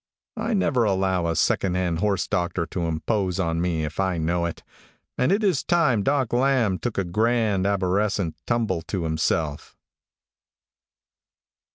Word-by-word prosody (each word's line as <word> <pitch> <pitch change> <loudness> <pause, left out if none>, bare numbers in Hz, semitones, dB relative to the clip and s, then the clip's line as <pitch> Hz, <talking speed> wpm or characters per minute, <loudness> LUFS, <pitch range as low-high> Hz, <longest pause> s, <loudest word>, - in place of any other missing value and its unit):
I 220 +1 -1
never 140 - +2
allow 95 -4 +1
a 85 - -1
secondhand 90 -3 +1
horse 100 -1 0
doctor 85 -1 -1
to 85 +1 -3
impose 90 +4 -1
on 85 -2 0
me, 85 -3 0
if 75 +3 -7
I 95 -2 +1
know 85 +2 0
it, 85 - -7 0.5
and 130 - +1
it 205 +3 +2
is 185 -9 +2
time 160 - +2
Doc 135 +1 0
Lamb 120 -6 +2
took 120 -3 -4
a 100 - +2
grand 105 +1 +1
aborescent 100 -2 0
tumble 115 -8 0
to 95 -4 -2
himself." 80 -2 -2
95 Hz, 145 wpm, -24 LUFS, 85-120 Hz, 0.5 s, never